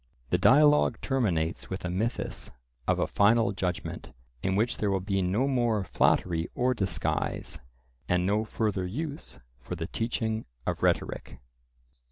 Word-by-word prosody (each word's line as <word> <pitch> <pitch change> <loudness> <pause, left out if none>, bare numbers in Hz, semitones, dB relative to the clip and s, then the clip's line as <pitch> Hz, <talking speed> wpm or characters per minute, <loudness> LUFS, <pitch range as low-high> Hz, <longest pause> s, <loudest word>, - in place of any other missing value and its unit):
The - - +3
dialogue 150 +2 +5
terminates 90 - -1
with 95 -1 -4
a - - -1
mythus 110 +7 -2 0.4
of - - +3
a - - +1
final 110 0 +3
judgment, 90 -3 -4 0.3
in 95 - 0
which 110 +4 +1
there 105 - 0
will 95 -1 +1
be 95 +1 -1
no 100 +9 +1
more 120 -6 +1
flattery 85 -1 +1
or 125 +1 +2
disguise, 95 -6 -2 0.5
and 90 0 +2
no 105 +3 +2
further 105 -4 -1
use 145 - -5 0.2
for 70 +8 -6
the 85 -1 -4
teaching 110 +2 -2 0.2
of - - -2
rhetoric. - - 0
105 Hz, 145 wpm, -28 LUFS, 90-120 Hz, 0.5 s, dialogue